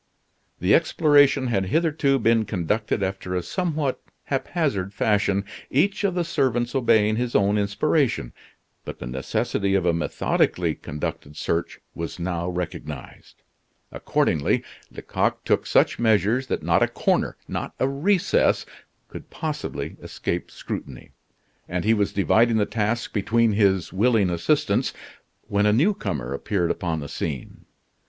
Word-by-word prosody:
The 90 Hz, +4 st, +3 dB
exploration 145 Hz, -4 st, +4 dB
had 100 Hz, -6 st, 0 dB
hitherto 155 Hz, -, +2 dB
been 115 Hz, -2 st, +3 dB
conducted 105 Hz, +2 st, -1 dB
after 95 Hz, -1 st, -3 dB
a 90 Hz, -, -1 dB
somewhat 155 Hz, -, -2 dB, 0.2 s
haphazard 135 Hz, -, -2 dB
fashion, 100 Hz, -2 st, +1 dB, 0.2 s
each 195 Hz, +10 st, +1 dB
of 195 Hz, -3 st, +1 dB
the 175 Hz, -, +1 dB
servants 125 Hz, -7 st, 0 dB
obeying 110 Hz, -5 st, +3 dB
his 120 Hz, 0 st, -2 dB
own 100 Hz, 0 st, +3 dB
inspiration; 105 Hz, -, 0 dB, 0.5 s
but -, -, -7 dB
the -, -, -7 dB
necessity 65 Hz, +9 st, -1 dB
of 95 Hz, -2 st, +1 dB
a 85 Hz, -, +3 dB
methodically 85 Hz, -, 0 dB
conducted 75 Hz, 0 st, -6 dB
search 85 Hz, +1 st, -2 dB
was 85 Hz, 0 st, -5 dB
now 85 Hz, 0 st, -2 dB
recognized. 80 Hz, -6 st, -7 dB, 0.5 s
Accordingly, 70 Hz, -2 st, 0 dB, 0.3 s
Lecoq -, -, -2 dB
took -, -, +1 dB
such -, -, +3 dB
measures 110 Hz, +3 st, +2 dB
that -, -, -2 dB
not -, -, +2 dB
a -, -, +4 dB
corner, -, -, 0 dB
not -, -, -4 dB
a 130 Hz, -, +2 dB
recess, 180 Hz, +8 st, +2 dB, 0.4 s
could -, -, -10 dB
possibly 155 Hz, -2 st, -4 dB
escape 85 Hz, -, -4 dB
scrutiny; 65 Hz, -3 st, -7 dB, 0.6 s
and 90 Hz, +1 st, -2 dB
he 110 Hz, -, +4 dB
was 105 Hz, -2 st, +1 dB
dividing 110 Hz, +5 st, +3 dB
the 105 Hz, -, +2 dB
task 115 Hz, +2 st, -2 dB
between 110 Hz, +2 st, +2 dB
his 95 Hz, -5 st, +2 dB
willing 105 Hz, -2 st, +3 dB
assistants, 85 Hz, -1 st, +1 dB, 0.5 s
when 100 Hz, +1 st, +2 dB
a -, -, +4 dB
new 150 Hz, -, +3 dB
comer 70 Hz, -, -4 dB
appeared 85 Hz, +4 st, -1 dB
upon 80 Hz, -4 st, -2 dB
the 70 Hz, -, -6 dB
scene. 70 Hz, -3 st, -5 dB
105 Hz, 135 wpm, -24 LUFS, 90-130 Hz, 0.6 s, exploration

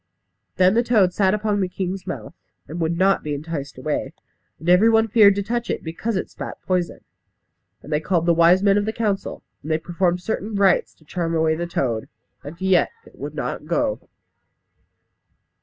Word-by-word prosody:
Then 185 Hz, +1 st, +4 dB
the 235 Hz, -, +4 dB
toad 210 Hz, -7 st, +3 dB
sat 195 Hz, +1 st, +2 dB
upon 210 Hz, -1 st, 0 dB
the 185 Hz, -, +1 dB
king's 185 Hz, 0 st, -4 dB
mouth, -, -, -6 dB, 0.3 s
and 165 Hz, +3 st, -6 dB
would 165 Hz, 0 st, 0 dB
not 195 Hz, +2 st, +3 dB
be 150 Hz, -1 st, -3 dB
enticed 145 Hz, -2 st, -6 dB
away. 145 Hz, +4 st, -3 dB, 0.4 s
And 160 Hz, -, -10 dB
every 180 Hz, +6 st, +6 dB
one 225 Hz, 0 st, +4 dB
feared 210 Hz, -2 st, +6 dB
to 200 Hz, -, -1 dB
touch 235 Hz, +2 st, -3 dB
it -, -, -2 dB
because 185 Hz, +7 st, -3 dB
it 190 Hz, -, -2 dB
spat -, -, -8 dB
poison. 180 Hz, -2 st, -1 dB, 0.8 s
And 150 Hz, -, -6 dB
they 150 Hz, -, +2 dB
called 170 Hz, +1 st, 0 dB
the 170 Hz, -, +4 dB
wise 170 Hz, +3 st, +5 dB
men 200 Hz, 0 st, +4 dB
of 205 Hz, -, -2 dB
the 220 Hz, -, -2 dB
council; 210 Hz, -4 st, -2 dB, 0.2 s
and 150 Hz, -, -8 dB
they 155 Hz, -, +2 dB
performed 175 Hz, +2 st, -1 dB
certain 215 Hz, +2 st, -3 dB
rites 195 Hz, -2 st, +2 dB
to 155 Hz, -, -25 dB
charm 165 Hz, +1 st, -2 dB
away 160 Hz, 0 st, +2 dB
the 170 Hz, +2 st, -3 dB
toad, 120 Hz, -9 st, -2 dB, 0.3 s
and 150 Hz, +4 st, -9 dB
yet 190 Hz, -2 st, +3 dB, 0.2 s
it -, -, -18 dB
would -, -, -6 dB
not -, -, -4 dB
go. -, -, -1 dB
180 Hz, 190 wpm, -22 LUFS, 165-205 Hz, 0.8 s, every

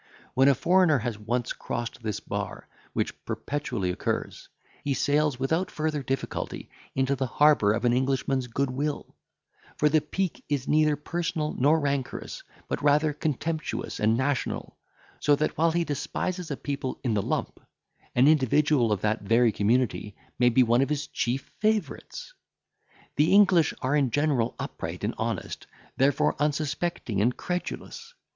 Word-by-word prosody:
When 135 Hz, +1 st, +4 dB
a 140 Hz, -, +6 dB
foreigner 175 Hz, +1 st, +4 dB
has 115 Hz, -3 st, -3 dB
once 120 Hz, +3 st, -2 dB
crossed 120 Hz, 0 st, -5 dB
this 110 Hz, -3 st, -3 dB
bar, -, -, -5 dB, 0.3 s
which -, -, -3 dB
perpetually 120 Hz, -10 st, -2 dB
occurs, -, -, -3 dB, 0.3 s
he 140 Hz, -1 st, 0 dB
sails 145 Hz, -2 st, +1 dB
without 160 Hz, +8 st, 0 dB
further 155 Hz, -1 st, -2 dB
difficulty 135 Hz, 0 st, -4 dB, 0.2 s
into 135 Hz, +1 st, +1 dB
the 130 Hz, -1 st, -1 dB
harbour 145 Hz, -5 st, +4 dB
of 115 Hz, +2 st, -1 dB
an 120 Hz, -, +4 dB
Englishman's 130 Hz, 0 st, 0 dB
goodwill; 140 Hz, +4 st, -2 dB, 0.6 s
for 150 Hz, -, +3 dB
the 155 Hz, +1 st, +3 dB
pique 180 Hz, +4 st, -3 dB
is 140 Hz, -3 st, -1 dB
neither 155 Hz, 0 st, +3 dB
personal 155 Hz, 0 st, -2 dB
nor 150 Hz, +5 st, +3 dB
rancorous, 140 Hz, -3 st, -3 dB, 0.3 s
but -, -, -3 dB
rather 150 Hz, +1 st, +3 dB
contemptuous 155 Hz, +1 st, -3 dB
and 110 Hz, +2 st, +3 dB
national; 130 Hz, +1 st, -2 dB, 0.4 s
so 145 Hz, -, +4 dB
that, 155 Hz, +2 st, -1 dB
while 165 Hz, +1 st, +3 dB
he 170 Hz, +1 st, +1 dB
despises 175 Hz, +4 st, -3 dB
a 140 Hz, -, -3 dB
people 140 Hz, -2 st, -4 dB
in 120 Hz, -4 st, +1 dB
the 105 Hz, -, +1 dB
lump, -, -, -3 dB, 0.6 s
an 125 Hz, +3 st, +5 dB
individual 145 Hz, -3 st, +3 dB
of 105 Hz, -, 0 dB
that 110 Hz, +1 st, 0 dB
very 115 Hz, +3 st, +3 dB
community 105 Hz, 0 st, 0 dB, 0.2 s
may 125 Hz, 0 st, +5 dB
be 125 Hz, +2 st, +5 dB
one 120 Hz, +1 st, +3 dB
of 135 Hz, -, +1 dB
his 150 Hz, -1 st, -1 dB
chief 125 Hz, +3 st, -3 dB
favourites. 215 Hz, -, -2 dB, 0.8 s
"The 150 Hz, +2 st, +4 dB
English 190 Hz, -6 st, +5 dB
are 130 Hz, +3 st, +1 dB
in 140 Hz, -3 st, +2 dB
general 140 Hz, -4 st, +1 dB
upright -, -, -6 dB
and -, -, 0 dB
honest, -, -, -3 dB, 0.3 s
therefore 135 Hz, +1 st, +2 dB
unsuspecting 150 Hz, -, -1 dB
and 120 Hz, +4 st, +1 dB
credulous. 455 Hz, -, -5 dB
140 Hz, 150 wpm, -27 LUFS, 125-155 Hz, 0.8 s, a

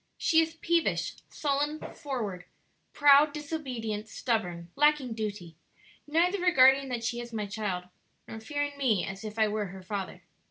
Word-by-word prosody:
She 320 Hz, -, +3 dB
is 325 Hz, 0 st, -2 dB
peevish, 335 Hz, 0 st, 0 dB, 0.2 s
sullen, 290 Hz, +1 st, -1 dB, 0.2 s
froward, 230 Hz, -, -4 dB, 0.5 s
Proud, 290 Hz, +1 st, +6 dB
disobedient, 255 Hz, -9 st, -4 dB
stubborn, 180 Hz, -9 st, -2 dB
lacking 295 Hz, -4 st, +3 dB
duty; 205 Hz, -7 st, -5 dB, 0.5 s
Neither 350 Hz, +6 st, +2 dB
regarding 270 Hz, -5 st, +5 dB
that 240 Hz, -2 st, -3 dB
she 240 Hz, +1 st, -2 dB
is 240 Hz, 0 st, -7 dB
my 215 Hz, -2 st, -3 dB
child, 200 Hz, -3 st, -3 dB, 0.4 s
Nor 225 Hz, -, -7 dB
fearing 290 Hz, +3 st, -3 dB
me 230 Hz, -9 st, +2 dB
as 195 Hz, +2 st, -7 dB
If 215 Hz, 0 st, -7 dB
I 220 Hz, -1 st, +4 dB
were 210 Hz, -1 st, -2 dB
her 190 Hz, +1 st, -10 dB
father. 195 Hz, 0 st, -5 dB
240 Hz, 150 wpm, -29 LUFS, 210-290 Hz, 0.5 s, Proud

